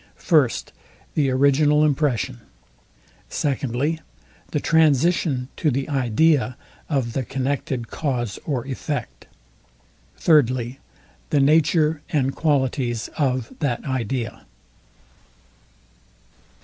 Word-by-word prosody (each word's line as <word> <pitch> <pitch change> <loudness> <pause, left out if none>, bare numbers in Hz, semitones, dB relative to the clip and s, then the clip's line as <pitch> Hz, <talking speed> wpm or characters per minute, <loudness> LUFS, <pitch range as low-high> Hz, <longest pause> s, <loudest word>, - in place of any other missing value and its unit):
First, 145 -8 +1 0.4
The 140 -3 +2
original 145 +3 +4
impression. 130 - 0 0.9
Secondly, 140 +2 -1 0.5
The 150 - -1
transition 155 -3 +2
to 155 - +1
the 135 0 -1
idea 130 -1 +2 0.3
of 130 -6 -1
the 135 - -1
connected 130 -2 -3
cause 120 -8 -2
or 130 -6 -2
effect. 140 +2 -5 0.9
Thirdly, 130 -5 +2 0.5
The 145 - +2
nature 155 +1 +3
and 135 -3 0
qualities 130 -6 0
of 130 -5 -1
that 140 -7 -1
idea. 125 -2 -3
135 Hz, 85 wpm, -23 LUFS, 125-150 Hz, 0.9 s, original